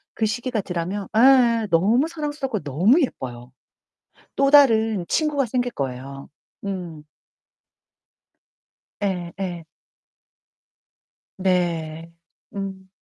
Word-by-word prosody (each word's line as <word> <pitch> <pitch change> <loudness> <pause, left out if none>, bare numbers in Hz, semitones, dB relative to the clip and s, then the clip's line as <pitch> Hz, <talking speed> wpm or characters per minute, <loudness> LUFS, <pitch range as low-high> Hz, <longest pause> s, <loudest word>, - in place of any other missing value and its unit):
그 220 - 0
시기가 240 0 -2
덜하면 185 +3 -4
에예, 235 -3 +5
너무 220 - +3
사랑스럽고 290 -8 -4
너무 185 - +3
예뻐요. 125 - -4 0.8
또 275 0 +3
다른 225 -9 +5
친구가 295 -4 +1
생길 245 +1 -1
거예요. 135 +1 -6 0.4
음. 175 -6 -5 2.0
예예. 180 -2 -4 1.7
네. 170 -3 -1 0.4
음. 190 -1 -6
195 Hz, 170 characters per minute, -23 LUFS, 170-245 Hz, 2.0 s, 에예